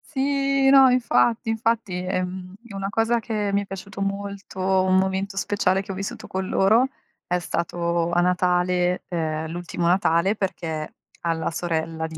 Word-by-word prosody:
Sì, 275 0 +2
no, 270 -1 +8
infatti, 235 -2 +2
infatti, 225 -2 0
ehm, 185 0 -3
è 225 - -12
una 195 0 -3
cosa 225 +2 +1
che 215 -3 -2
mi 200 0 +1
è - - -11
piaciuto 195 +1 -8
molto, 200 -1 -4
un 185 0 +2
momento 190 +1 0
speciale 195 -1 +1
che 195 - -7
ho - - -5
vissuto 195 +1 -5
con 190 0 -3
loro, 220 +8 +4 0.4
è 180 - +1
stato 170 0 -1
a 175 0 +3
Natale, 180 0 +1
ehm, 160 -2 -2
l'ultimo 175 0 -3
Natale, 180 +2 +2
perché 160 -6 -3 0.3
alla 165 -1 -1
sorella 165 -1 -2
di 160 -1 -9
190 Hz, 160 wpm, -23 LUFS, 175-205 Hz, 0.4 s, no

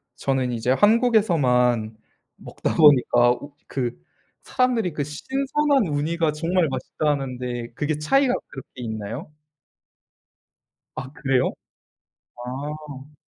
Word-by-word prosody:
저는 130 -2 -1
이제 120 +2 0
한국에서만 135 - +3 0.4
먹다 - - -4
보니까 125 -5 +5
우 140 +3 -5
그 120 - -3 0.4
사람들이 245 - 0
그 145 - -2
"신선한 270 - 0
우니가 155 +2 0
정말 165 +2 +1
맛있다." 135 +3 -2
하는데 125 -3 -4
그게 150 +2 -2
차이가 255 - +2
그렇게 135 -1 -10
있나요? 115 - -5 1.7
아 130 0 -6
그래요? 135 -2 0 0.9
아 145 +1 -7
145 Hz, 230 characters per minute, -23 LUFS, 125-170 Hz, 1.7 s, 보니까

